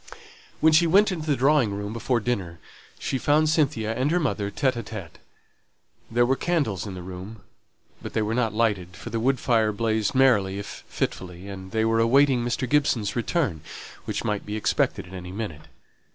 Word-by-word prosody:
When 160 Hz, 0 st, +5 dB
she 170 Hz, +2 st, +5 dB
went 200 Hz, +5 st, +5 dB
into 160 Hz, -4 st, -4 dB
the 145 Hz, -, +3 dB
drawing 130 Hz, -5 st, +3 dB
room 105 Hz, +1 st, -4 dB
before 120 Hz, +1 st, 0 dB
dinner, 100 Hz, -8 st, -2 dB, 0.4 s
she 130 Hz, -, -2 dB
found 150 Hz, +4 st, +3 dB
Cynthia 130 Hz, -9 st, +1 dB
and 130 Hz, +5 st, 0 dB
her 175 Hz, +3 st, +2 dB
mother 110 Hz, -10 st, -1 dB
by 130 Hz, +6 st, +1 dB
themselves. 110 Hz, -7 st, -8 dB, 0.9 s
There 120 Hz, +1 st, +3 dB
were 130 Hz, +2 st, +2 dB
candles 130 Hz, -, -1 dB
in 95 Hz, -, -6 dB
the 90 Hz, -, -7 dB
room, 95 Hz, +3 st, -9 dB, 0.6 s
but -, -, -7 dB
they 110 Hz, -, +1 dB
were 105 Hz, +1 st, -1 dB
not 115 Hz, -2 st, +1 dB
lighted, 100 Hz, -5 st, 0 dB
for -, -, -8 dB
the 115 Hz, -, -1 dB
wood 130 Hz, +2 st, +1 dB
fire 110 Hz, -4 st, +2 dB
blazed 110 Hz, -1 st, 0 dB
merrily 105 Hz, -8 st, +4 dB
if 100 Hz, -, -7 dB
fitfully, 90 Hz, +1 st, -4 dB
and 95 Hz, -1 st, -8 dB
they 110 Hz, +2 st, 0 dB
were 115 Hz, 0 st, +2 dB
awaiting 130 Hz, +2 st, +4 dB
Mr. 120 Hz, +2 st, -1 dB
Gibson's 125 Hz, -8 st, +1 dB
return, 120 Hz, -, -1 dB, 0.4 s
which -, -, -3 dB
might 105 Hz, -1 st, -1 dB
be 105 Hz, -, -5 dB
expected 110 Hz, -, 0 dB
at 90 Hz, -, -13 dB
any 90 Hz, -1 st, -7 dB
minute. 95 Hz, -7 st, -6 dB
115 Hz, 185 wpm, -25 LUFS, 100-135 Hz, 0.9 s, When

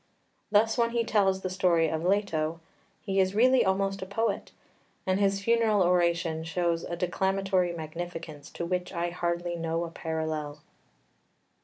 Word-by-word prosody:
Thus 220 Hz, +3 st, +3 dB
when 235 Hz, 0 st, +3 dB
he 235 Hz, -1 st, +2 dB
tells 195 Hz, -4 st, +2 dB
the 185 Hz, -, -3 dB
story 175 Hz, -3 st, +3 dB
of 160 Hz, +1 st, -2 dB
Leto 170 Hz, -4 st, 0 dB, 0.4 s
he 195 Hz, -2 st, 0 dB
is 190 Hz, +1 st, +2 dB
really 255 Hz, +3 st, +5 dB
almost 195 Hz, +1 st, 0 dB
a 190 Hz, -, -5 dB
poet; 225 Hz, +4 st, -2 dB, 0.5 s
and 185 Hz, +1 st, +1 dB
his 200 Hz, 0 st, +1 dB
funeral 225 Hz, -3 st, +3 dB
oration 170 Hz, -2 st, +1 dB
shows 170 Hz, 0 st, -1 dB
a 175 Hz, -, -4 dB
declamatory 190 Hz, +1 st, 0 dB
magnificence 165 Hz, -2 st, -7 dB
to 170 Hz, -, -4 dB
which 180 Hz, +1 st, -2 dB
I 175 Hz, -1 st, -2 dB
hardly 175 Hz, 0 st, -2 dB
know 165 Hz, 0 st, -2 dB
a 170 Hz, -, -6 dB
parallel. 160 Hz, -2 st, -4 dB
180 Hz, 150 wpm, -28 LUFS, 165-195 Hz, 0.5 s, really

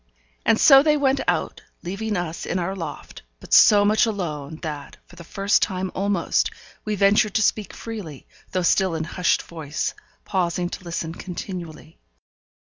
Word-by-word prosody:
And 220 Hz, -, +4 dB
so 270 Hz, -2 st, +8 dB
they 300 Hz, 0 st, +3 dB
went 275 Hz, -1 st, +2 dB
out, -, -, -1 dB, 0.2 s
leaving 200 Hz, +3 st, -3 dB
us 170 Hz, -2 st, -4 dB
in 185 Hz, -, -1 dB
our 185 Hz, +2 st, -2 dB
loft, 165 Hz, -5 st, -8 dB, 0.2 s
but -, -, -7 dB
so 205 Hz, -1 st, +7 dB
much 215 Hz, +3 st, +3 dB
alone, 160 Hz, -8 st, -4 dB
that, 150 Hz, -3 st, -6 dB
for 180 Hz, -, -17 dB
the 170 Hz, -, -11 dB
first 195 Hz, +4 st, +1 dB
time 185 Hz, -2 st, -1 dB
almost, 200 Hz, +1 st, 0 dB, 0.3 s
we 215 Hz, -1 st, -2 dB
ventured 200 Hz, +2 st, +3 dB
to 220 Hz, -, +3 dB
speak 210 Hz, 0 st, 0 dB
freely, 200 Hz, -, -8 dB, 0.3 s
though 185 Hz, -1 st, -1 dB
still 185 Hz, 0 st, +2 dB
in 160 Hz, -, -2 dB
hushed 180 Hz, +2 st, 0 dB
voice, 155 Hz, -3 st, -4 dB, 0.3 s
pausing 180 Hz, -2 st, -1 dB
to 185 Hz, -, -8 dB
listen 170 Hz, -1 st, -4 dB
continually. 170 Hz, -3 st, -8 dB
185 Hz, 160 wpm, -23 LUFS, 170-210 Hz, 0.3 s, so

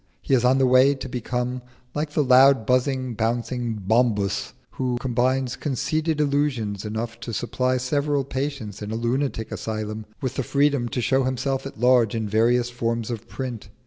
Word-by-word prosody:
He -, -, -1 dB
is 125 Hz, -2 st, +4 dB
on 130 Hz, +1 st, +4 dB
the 135 Hz, -, +4 dB
way 130 Hz, +2 st, +5 dB
to 135 Hz, -, -7 dB
become 125 Hz, 0 st, -3 dB, 0.3 s
like 150 Hz, +1 st, -2 dB
the 150 Hz, -, +2 dB
loud 130 Hz, -2 st, +6 dB
buzzing, 130 Hz, 0 st, +1 dB
bouncing 120 Hz, +1 st, -1 dB
Bombus 105 Hz, 0 st, +1 dB, 0.2 s
who 125 Hz, -2 st, -2 dB
combines 130 Hz, 0 st, 0 dB
conceited 150 Hz, +3 st, -1 dB
illusions 140 Hz, -9 st, 0 dB
enough 115 Hz, +2 st, -4 dB
to 120 Hz, -, -6 dB
supply 125 Hz, +3 st, 0 dB
several 140 Hz, +2 st, 0 dB
patients 130 Hz, -7 st, -4 dB
in 105 Hz, -, -5 dB
a 110 Hz, -, -3 dB
lunatic 120 Hz, 0 st, -1 dB
asylum 110 Hz, -1 st, -4 dB
with 130 Hz, -1 st, -3 dB
the 135 Hz, -, 0 dB
freedom 140 Hz, -2 st, +1 dB
to 125 Hz, -, -2 dB
show 130 Hz, +4 st, +2 dB
himself 130 Hz, +1 st, -1 dB
at 135 Hz, -, -11 dB
large 120 Hz, -3 st, +4 dB
in 110 Hz, -1 st, -2 dB
various 120 Hz, +3 st, +2 dB
forms 115 Hz, -1 st, -2 dB
of 115 Hz, -1 st, -6 dB
print. 125 Hz, -6 st, -6 dB
125 Hz, 170 wpm, -24 LUFS, 115-135 Hz, 0.3 s, loud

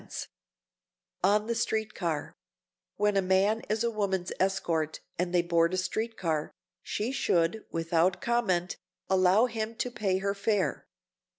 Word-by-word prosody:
[Sidenote: -, -, -7 dB, 1.0 s
ON 210 Hz, +2 st, +4 dB
THE 235 Hz, -, -1 dB
STREET 220 Hz, -2 st, -1 dB
CAR] 165 Hz, -5 st, -3 dB, 0.6 s
When 210 Hz, 0 st, +2 dB
a 195 Hz, -, +4 dB
man 195 Hz, +4 st, +2 dB
is 215 Hz, +2 st, +1 dB
a 235 Hz, -, +1 dB
woman's 195 Hz, -4 st, -1 dB
escort 165 Hz, -5 st, 0 dB, 0.2 s
and 180 Hz, 0 st, 0 dB
they 175 Hz, -1 st, +3 dB
board 170 Hz, +1 st, +2 dB
a -, -, -2 dB
street 220 Hz, +5 st, -2 dB
car, 155 Hz, -4 st, -1 dB, 0.3 s
she 220 Hz, +5 st, -2 dB
should, 180 Hz, -5 st, +1 dB
without 165 Hz, +2 st, +1 dB
comment, 195 Hz, -7 st, 0 dB, 0.3 s
allow 190 Hz, +4 st, +5 dB
him 225 Hz, -1 st, -3 dB
to 245 Hz, +2 st, -2 dB
pay 205 Hz, -6 st, 0 dB
her 200 Hz, +1 st, -1 dB
fare. 205 Hz, -1 st, 0 dB
195 Hz, 150 wpm, -29 LUFS, 175-220 Hz, 1.0 s, allow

